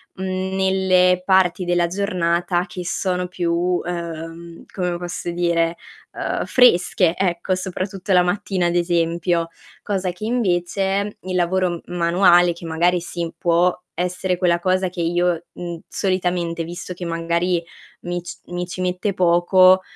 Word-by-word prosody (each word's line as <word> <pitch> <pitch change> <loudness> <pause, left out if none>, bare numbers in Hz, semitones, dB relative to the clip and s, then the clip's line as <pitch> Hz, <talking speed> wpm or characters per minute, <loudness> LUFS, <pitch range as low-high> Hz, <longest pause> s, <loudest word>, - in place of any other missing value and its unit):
mhmm, 190 0 -3
nelle 185 -1 +3
parti 185 -1 +3
della 175 -1 +2
giornata 175 -2 0
che 180 -1 -7
sono 180 0 -1
più, 175 -1 -2
uhm, 170 -1 -3
come 180 -2 -2
posso 175 0 -5
dire, 170 -1 0 0.3
uhm, - - -3
fresche, 180 -7 +4
ecco, 185 0 0
soprattutto 190 +1 -3
la 180 - +6
mattina 180 0 0
ad 170 - -1
esempio. 170 0 +1 0.3
Cosa 190 -3 -2
che 180 +5 -7
invece 195 -2 0
il 185 0 -4
lavoro 180 -1 0
m 175 - -8
manuale 175 0 +4
che 170 0 -11
magari 170 +2 +1
sì, 170 -1 -4
può 175 +1 +2 0.2
essere 180 +1 -1
quella 175 -2 +2
cosa 185 +1 +1
che 175 -1 -5
io, 175 0 0
mhmm, 175 -2 -6
solitamente, 180 -3 -1
visto 175 +2 -7
che 175 0 -7
magari 170 +1 0 0.4
mi 175 0 -3
c 175 - -8
mi 175 0 -4
ci 185 +1 -6
mette 185 +2 -1
poco, 185 +1 +5
180 Hz, 140 wpm, -21 LUFS, 170-185 Hz, 0.4 s, la